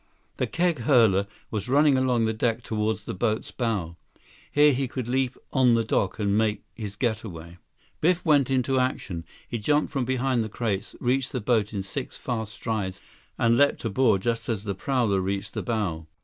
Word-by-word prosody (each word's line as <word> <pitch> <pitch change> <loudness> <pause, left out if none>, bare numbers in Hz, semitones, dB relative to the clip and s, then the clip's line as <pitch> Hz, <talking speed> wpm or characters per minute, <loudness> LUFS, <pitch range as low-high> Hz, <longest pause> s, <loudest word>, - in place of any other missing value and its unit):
The - - 0
keg 170 -4 +1
hurler 115 -6 +4 0.2
was 105 +1 -3
running 145 +1 +5
along 125 -3 +2
the 110 - 0
deck 115 +1 0
toward 110 0 -1
the 110 +2 -7
boat's 110 +2 -1
bow. 100 -9 -2 0.5
Here 145 0 +5
he 130 +1 0
could 125 -1 -5
leap 130 +1 0 0.2
on 125 -3 +5
the 115 - +2
dock 100 -3 0
and 100 -2 +1
make 110 -1 +1
his 105 -3 -6
getaway. 95 -8 -4 0.4
Biff 180 +2 +2
went 145 -5 +4
into 130 0 +2
action. 95 -10 -2 0.2
He 120 - -3
jumped 150 +8 +1
from 135 -4 0
behind 130 -1 +1
the 110 - -5
crates, 105 -3 -3
reached 130 +2 0
the 130 - -1
boat 110 -2 +1
in 100 -3 -3
six 95 - -5
fast 110 -3 -3
strides, 105 -5 -3 0.4
and 115 0 +3
leaped 145 -4 +3
aboard 110 -3 +2
just 115 -1 -1
as 105 -4 -1
the 100 -2 -2
prowler 110 -2 +1
reached 95 +1 -3
the - - -2
bow. 95 -9 -2
115 Hz, 185 wpm, -26 LUFS, 105-130 Hz, 0.5 s, running